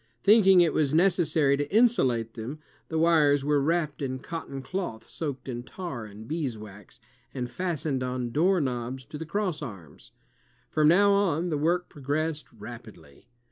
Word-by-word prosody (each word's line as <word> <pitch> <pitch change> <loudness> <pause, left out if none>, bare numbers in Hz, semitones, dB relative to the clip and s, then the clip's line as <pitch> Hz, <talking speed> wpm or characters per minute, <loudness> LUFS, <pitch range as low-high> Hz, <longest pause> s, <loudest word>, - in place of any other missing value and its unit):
Thinking 195 -3 +7
it 170 - +3
was 150 -1 +1
necessary 165 -5 +3
to 145 0 -3
insulate 130 - +2
them, 120 +6 -6 0.3
the 160 - -3
wires 150 -4 +4
were 145 -1 +2
wrapped 155 0 0
in 130 -2 -2
cotton 140 -2 -7
cloth 175 - -5
soaked 145 -5 -5
in 120 -2 -4
tar 130 -4 -7
and 105 +1 -11
beeswax, 110 - -6 0.4
and 125 -2 -2
fastened 155 -7 -2
on 125 -1 -3
door 180 +7 +3
knobs 130 -2 -3
to 150 - -9
the 160 - -6
crossarms. 150 - -5 0.6
From 155 -1 +3
now 200 +5 +5
on, 180 -4 +1
the 155 - 0
work 175 +4 +1
progressed 150 +2 -3
rapidly. 105 - -12
145 Hz, 150 wpm, -27 LUFS, 125-170 Hz, 0.6 s, Thinking